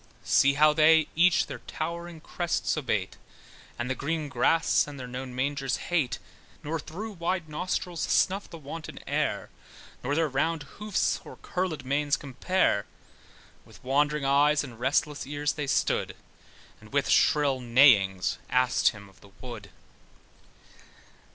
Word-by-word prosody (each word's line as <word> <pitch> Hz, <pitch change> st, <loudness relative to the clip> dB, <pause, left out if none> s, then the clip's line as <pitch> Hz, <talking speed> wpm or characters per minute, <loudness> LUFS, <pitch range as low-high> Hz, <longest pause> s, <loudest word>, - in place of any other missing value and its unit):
See 140 Hz, 0 st, +4 dB
how 150 Hz, +1 st, +5 dB
they 155 Hz, 0 st, +5 dB
each 175 Hz, +2 st, +4 dB
his -, -, -7 dB
towering 170 Hz, 0 st, -5 dB
crest 175 Hz, +1 st, -1 dB
abate, 105 Hz, -11 st, -2 dB, 0.6 s
And 120 Hz, -, -3 dB
the 130 Hz, -, 0 dB
green 150 Hz, +2 st, -3 dB
grass, 150 Hz, +7 st, +2 dB
and 145 Hz, -2 st, -9 dB
their 130 Hz, -, -6 dB
known 125 Hz, 0 st, -7 dB
mangers 135 Hz, 0 st, -1 dB
hate, 160 Hz, -8 st, -1 dB, 0.5 s
Nor 160 Hz, +2 st, -3 dB
through 205 Hz, +9 st, -7 dB
wide 175 Hz, -2 st, -2 dB
nostrils 175 Hz, +2 st, -3 dB
snuff 195 Hz, +1 st, +1 dB
the 165 Hz, -, -9 dB
wanton 160 Hz, +2 st, -8 dB
air, -, -, -1 dB, 0.5 s
Nor 140 Hz, +4 st, -1 dB
their 165 Hz, 0 st, +2 dB
round 150 Hz, +3 st, -1 dB
hoofs, 205 Hz, +8 st, -1 dB
or -, -, -11 dB
curlèd 180 Hz, -7 st, -3 dB
manes 145 Hz, +2 st, +1 dB
compare; 140 Hz, -, 0 dB, 0.8 s
With -, -, -18 dB
wandering 145 Hz, +2 st, +1 dB
eyes, 145 Hz, +2 st, +3 dB
and 120 Hz, -5 st, -10 dB
restless 145 Hz, +3 st, 0 dB
ears 145 Hz, +1 st, -1 dB
they 150 Hz, -2 st, -4 dB
stood, -, -, 0 dB, 0.6 s
And -, -, -16 dB
with -, -, +1 dB
shrill 145 Hz, -3 st, +3 dB
neighings 115 Hz, -7 st, +4 dB
asked 125 Hz, 0 st, +2 dB
him 100 Hz, -2 st, -1 dB
of 95 Hz, -, -22 dB
the 100 Hz, -, -16 dB
wood. 115 Hz, -6 st, -9 dB
145 Hz, 140 wpm, -27 LUFS, 130-165 Hz, 0.8 s, how